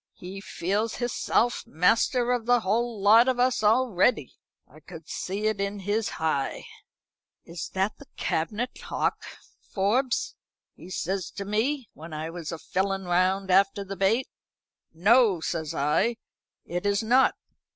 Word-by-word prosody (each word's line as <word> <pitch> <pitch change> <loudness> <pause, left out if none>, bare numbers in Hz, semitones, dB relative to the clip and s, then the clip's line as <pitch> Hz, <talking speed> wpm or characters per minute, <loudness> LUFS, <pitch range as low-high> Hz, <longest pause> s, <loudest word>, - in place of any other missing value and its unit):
"He 190 +2 -8
feels 205 +5 -2
hisself 240 0 0
master 235 +6 +2
of 240 -2 -1
the 245 -1 +4
whole 225 +3 -1
lot 220 +5 +6
of 255 -1 +1
us 250 -2 +2
already. 220 - +2 0.3
I 150 - -17
could 160 +1 -12
see 200 +3 -4
it 215 -2 0
in 200 +1 -2
his 205 +3 -1
hi. 155 -4 -1 0.8
'Is 170 -1 -6
that 190 +2 -1
the 285 - -14
cabinet 215 +10 -3
'ock, - - -1 0.5
Forbes?' 230 +6 0 0.4
he - - -13
says 185 0 -3
to 200 - -5
me, 235 +6 -1
when 160 +1 -10
I 155 +1 -4
was 170 -2 -6
a 165 - -4
filling 195 +3 -2
round 185 +2 +1
after 195 +1 +3
the 195 0 -6
bait. 195 +7 +1 0.6
'No,' 205 +3 +4
says 160 -1 -3
I, 150 +12 +1 0.5
'it 175 +1 -4
is 200 +1 +1
not. 250 +4 +4
200 Hz, 145 wpm, -26 LUFS, 180-235 Hz, 0.8 s, lot